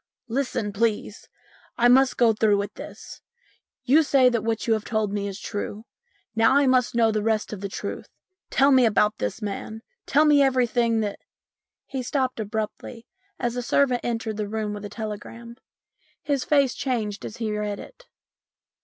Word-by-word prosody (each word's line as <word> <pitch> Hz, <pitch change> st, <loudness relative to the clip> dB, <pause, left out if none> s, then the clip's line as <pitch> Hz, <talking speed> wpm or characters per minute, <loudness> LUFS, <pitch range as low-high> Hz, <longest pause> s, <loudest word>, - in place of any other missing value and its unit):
"Listen, 230 Hz, -4 st, -2 dB
please. 215 Hz, 0 st, -2 dB, 0.5 s
I 240 Hz, -, +4 dB
must 260 Hz, +2 st, +4 dB
go 235 Hz, -2 st, +4 dB
through 210 Hz, -1 st, +3 dB
with 200 Hz, 0 st, -3 dB
this. -, -, -10 dB, 0.6 s
You 275 Hz, +6 st, +5 dB
say 275 Hz, -4 st, +4 dB
that 235 Hz, -3 st, -1 dB
what 225 Hz, -1 st, -1 dB
you 230 Hz, -, +3 dB
have 215 Hz, -1 st, -1 dB
told 220 Hz, -3 st, -1 dB
me 200 Hz, -1 st, -2 dB
is 195 Hz, 0 st, -6 dB
true. 205 Hz, +1 st, -5 dB, 0.5 s
Now 225 Hz, +4 st, +4 dB
I 285 Hz, -, +4 dB
must 255 Hz, -2 st, +2 dB
know 225 Hz, -1 st, +4 dB
the 215 Hz, -1 st, -1 dB
rest 220 Hz, 0 st, -1 dB
of 200 Hz, -, -7 dB
the 200 Hz, -, -4 dB
truth. -, -, -6 dB, 0.4 s
Tell 275 Hz, +1 st, +4 dB
me 260 Hz, -3 st, +6 dB
about 210 Hz, 0 st, +2 dB
this 225 Hz, -, -3 dB
man. 215 Hz, +2 st, -5 dB, 0.2 s
Tell 300 Hz, +2 st, +4 dB
me 295 Hz, -1 st, +5 dB
everything 240 Hz, -4 st, +2 dB
that 205 Hz, -2 st, -3 dB, 0.3 s
" -, -, -68 dB
He 265 Hz, -2 st, -4 dB
stopped 255 Hz, -1 st, -1 dB
abruptly 220 Hz, +2 st, -5 dB, 0.3 s
as 240 Hz, -1 st, -2 dB
a 245 Hz, -, -2 dB
servant 250 Hz, 0 st, +2 dB
entered 225 Hz, -2 st, -3 dB
the 210 Hz, -1 st, -2 dB
room 215 Hz, -1 st, -3 dB
with 205 Hz, 0 st, -7 dB
a -, -, -6 dB
telegram. 230 Hz, +2 st, -7 dB, 0.7 s
His 280 Hz, -3 st, 0 dB
face 280 Hz, -3 st, +3 dB
changed 220 Hz, -6 st, -3 dB
as 215 Hz, -, -7 dB
he 220 Hz, -2 st, -2 dB
read 210 Hz, -1 st, -3 dB
it. -, -, -13 dB
225 Hz, 180 wpm, -24 LUFS, 210-255 Hz, 0.7 s, me